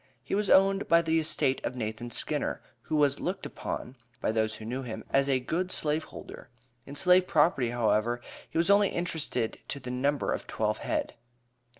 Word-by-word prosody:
He -, -, -5 dB
was 205 Hz, 0 st, +1 dB
owned 195 Hz, +1 st, +5 dB
by 170 Hz, 0 st, +5 dB
the 160 Hz, 0 st, +2 dB
estate 145 Hz, -4 st, +1 dB
of 125 Hz, -, -3 dB
Nathan 115 Hz, 0 st, -4 dB
Skinner, -, -, -2 dB, 0.2 s
who 155 Hz, -, -3 dB
was 145 Hz, -2 st, +3 dB
"looked 185 Hz, +2 st, -3 dB
upon," 125 Hz, +2 st, -5 dB, 0.2 s
by -, -, 0 dB
those 110 Hz, 0 st, 0 dB
who 110 Hz, -, -9 dB
knew 125 Hz, +4 st, -3 dB
him, 120 Hz, -4 st, -6 dB
"as 140 Hz, 0 st, +3 dB
a 130 Hz, -1 st, +3 dB
good 175 Hz, +8 st, -2 dB
slave 155 Hz, -1 st, 0 dB
holder." -, -, -11 dB, 0.4 s
In 140 Hz, -, -8 dB
slave 180 Hz, +3 st, +4 dB
property, 150 Hz, -6 st, +3 dB
however, 120 Hz, 0 st, +1 dB, 0.3 s
he -, -, -4 dB
was 170 Hz, +4 st, +3 dB
only 200 Hz, 0 st, +5 dB
interested 160 Hz, -9 st, -2 dB
to 140 Hz, -, -4 dB
the 125 Hz, -2 st, -6 dB
number 140 Hz, +3 st, 0 dB
of -, -, -5 dB
twelve -, -, -1 dB
head. -, -, -2 dB
140 Hz, 190 wpm, -29 LUFS, 125-170 Hz, 0.4 s, owned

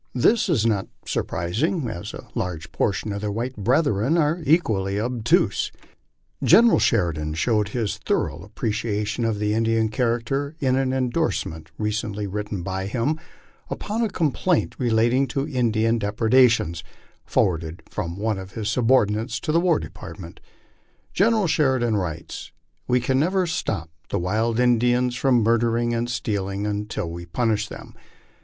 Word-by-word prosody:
This 215 Hz, -, +3 dB
is 130 Hz, -10 st, +2 dB
not 105 Hz, -4 st, +1 dB, 0.2 s
surprising, 125 Hz, -, -1 dB
as 85 Hz, -6 st, -5 dB
a -, -, -10 dB
large 85 Hz, -3 st, -4 dB
proportion 100 Hz, +1 st, -1 dB
of 100 Hz, -, -4 dB
their 105 Hz, -1 st, -2 dB
white 120 Hz, +5 st, -3 dB
brethren 125 Hz, -, +2 dB
are 160 Hz, +2 st, +1 dB
equally 105 Hz, -, +2 dB
obtuse. 120 Hz, 0 st, +1 dB
Lieutenant -, -, -11 dB
General 225 Hz, +7 st, +7 dB
Sheridan 80 Hz, -8 st, +1 dB
showed 105 Hz, +4 st, +1 dB
his 110 Hz, -2 st, -2 dB
thorough 75 Hz, +3 st, -1 dB
appreciation 105 Hz, +2 st, -2 dB
of 110 Hz, -2 st, 0 dB
the 105 Hz, 0 st, 0 dB
Indian 115 Hz, 0 st, +2 dB
character, 125 Hz, +6 st, -1 dB
in 130 Hz, -2 st, +2 dB
an 135 Hz, -1 st, +1 dB
endorsement 125 Hz, -, -1 dB
recently 105 Hz, -1 st, -2 dB
written 105 Hz, -1 st, -4 dB
by 95 Hz, +1 st, -3 dB
him 130 Hz, +8 st, -1 dB, 0.5 s
upon 215 Hz, +3 st, -3 dB
a 225 Hz, -, +1 dB
complaint 170 Hz, 0 st, 0 dB
relating 120 Hz, +2 st, +2 dB
to 135 Hz, +3 st, -2 dB
Indian 115 Hz, -2 st, +1 dB
depredations, 110 Hz, -5 st, +3 dB, 0.4 s
forwarded 80 Hz, -2 st, 0 dB
from 85 Hz, -4 st, -4 dB
one 105 Hz, -1 st, -1 dB
of 95 Hz, 0 st, -9 dB
his 110 Hz, -3 st, -3 dB
subordinates 115 Hz, -2 st, +2 dB
to -, -, -1 dB
the 165 Hz, -, +4 dB
War 175 Hz, -3 st, +3 dB
Depart 85 Hz, 0 st, -8 dB
ment. 85 Hz, -2 st, -10 dB, 0.7 s
General 215 Hz, +1 st, +3 dB
Sheridan 130 Hz, -8 st, +2 dB
writes, 85 Hz, -5 st, -4 dB, 0.2 s
" -, -, -45 dB
We 125 Hz, -, +3 dB
can 130 Hz, +2 st, +1 dB
never 185 Hz, +5 st, +2 dB
stop 85 Hz, -, -3 dB, 0.2 s
the -, -, -1 dB
wild 110 Hz, +6 st, 0 dB
Indians 125 Hz, 0 st, +3 dB
from 125 Hz, -3 st, +3 dB
murdering 115 Hz, +1 st, +2 dB
and 120 Hz, +1 st, -1 dB
stealing 100 Hz, -4 st, -2 dB
until 105 Hz, -4 st, -3 dB
we 85 Hz, +1 st, -7 dB
punish 110 Hz, +2 st, 0 dB
them. -, -, -10 dB
115 Hz, 150 wpm, -23 LUFS, 100-130 Hz, 0.7 s, General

